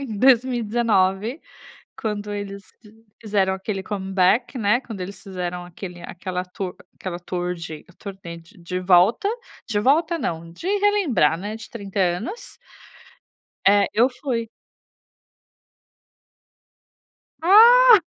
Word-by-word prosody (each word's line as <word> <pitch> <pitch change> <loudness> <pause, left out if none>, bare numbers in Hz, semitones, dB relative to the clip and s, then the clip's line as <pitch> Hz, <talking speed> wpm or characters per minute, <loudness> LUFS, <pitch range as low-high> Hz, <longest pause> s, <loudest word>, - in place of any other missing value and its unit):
em 230 -7 -5
2019, 235 - +2 0.6
quando 210 -1 -3
eles 200 -1 -6 0.6
fizeram 200 -4 +1
aquele 195 +1 -4
comeback, 195 +5 0
né, 215 +2 +2
quando 220 -7 -8
eles 185 +1 -7
fizeram 180 -2 -5
aquele 175 0 -9
aquele 180 +1 -6 0.6
aquela 180 -2 -6
tour 180 0 -3
de 160 -3 -8
turnê 190 -4 -8
de 165 +2 -19
de 180 +1 -4
volta 185 - +4 0.4
de 210 -2 0
volta 320 +8 +2
não, 165 - -4
de 175 - -9
relembrar, 390 - +2
né, 205 +4 -5
de 225 - -11
30 200 -3 -7
anos 190 - -2 1.1
é, 200 +1 +5
eu 235 +4 +4
fui. 230 -5 -2 2.9
Ah. 460 +5 +8
205 Hz, 110 wpm, -22 LUFS, 180-240 Hz, 2.9 s, Ah